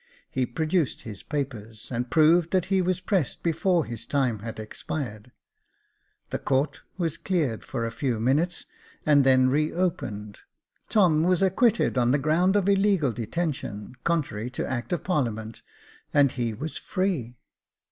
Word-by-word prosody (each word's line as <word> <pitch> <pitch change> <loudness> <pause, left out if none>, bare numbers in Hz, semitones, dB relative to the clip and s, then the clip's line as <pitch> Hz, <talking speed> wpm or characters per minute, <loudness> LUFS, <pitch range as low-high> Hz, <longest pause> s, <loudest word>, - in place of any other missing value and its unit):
He 130 -1 0
produced 160 +3 0
his 105 -3 -8
papers, 115 -7 -5
and 125 0 -2
proved 165 +3 +4
that 185 -1 +1
he 190 - +4
was 185 0 0
pressed 185 - -1
before 170 0 +2
his 115 -2 -7
time 130 -6 +1
had 110 +1 -7
expired. 110 +1 -5 1.0
The - - -2
court 135 +3 0 0.2
was 170 -3 -1
cleared 155 - -1
for 115 - -3
a 115 - -3
few 120 -1 -1
minutes, 150 +10 +1 0.4
and 145 -2 +5
then 130 -1 +5
re 150 +3 +1
opened. 105 - -3 0.5
Tom 175 -8 +4
was 180 +2 +3
acquitted 195 - +3
on 120 -1 +3
the 135 - +4
ground 165 +7 +2
of 200 -2 +2
illegal 195 -8 +3
detention, 120 -3 -4
contrary 135 -9 -1
to 125 - -3
act 125 +3 -3
of 175 - -1
parliament, 115 - -2 0.5
and 140 -2 +4
he 120 -3 -2
was 145 +9 -5
free. 170 - -2
145 Hz, 150 wpm, -26 LUFS, 120-175 Hz, 1.0 s, and